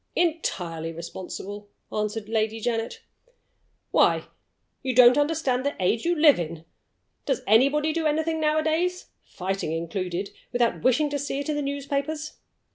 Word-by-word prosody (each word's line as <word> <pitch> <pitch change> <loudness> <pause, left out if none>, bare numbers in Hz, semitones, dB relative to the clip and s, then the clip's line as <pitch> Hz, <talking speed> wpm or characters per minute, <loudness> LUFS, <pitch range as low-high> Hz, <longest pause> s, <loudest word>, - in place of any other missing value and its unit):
"Entirely 175 - -1
responsible," 190 +4 -7 0.2
answered 210 0 -2
Lady 220 0 0
Janet. 225 0 -2 0.9
"Why, - - +4 0.6
you 260 -2 -2
don't 250 0 +8
understand 290 -4 +1
the 285 +1 -1
age 205 - +1
you 345 +1 +2
live 300 - +6
in! 165 -1 -5 0.6
Does 270 -3 0
anybody 280 +8 +4
do 325 -1 0
anything 315 +1 0
nowadays 315 +4 0
(fighting 190 -3 -4
included) 175 +3 -3 0.2
without 240 -1 +1
wishing 290 +4 +2
to 285 - -1
see 280 0 -3
it 285 - -4
in 300 - 0
the 295 - -1
newspapers? 280 +2 -3
255 Hz, 135 wpm, -25 LUFS, 205-305 Hz, 0.9 s, don't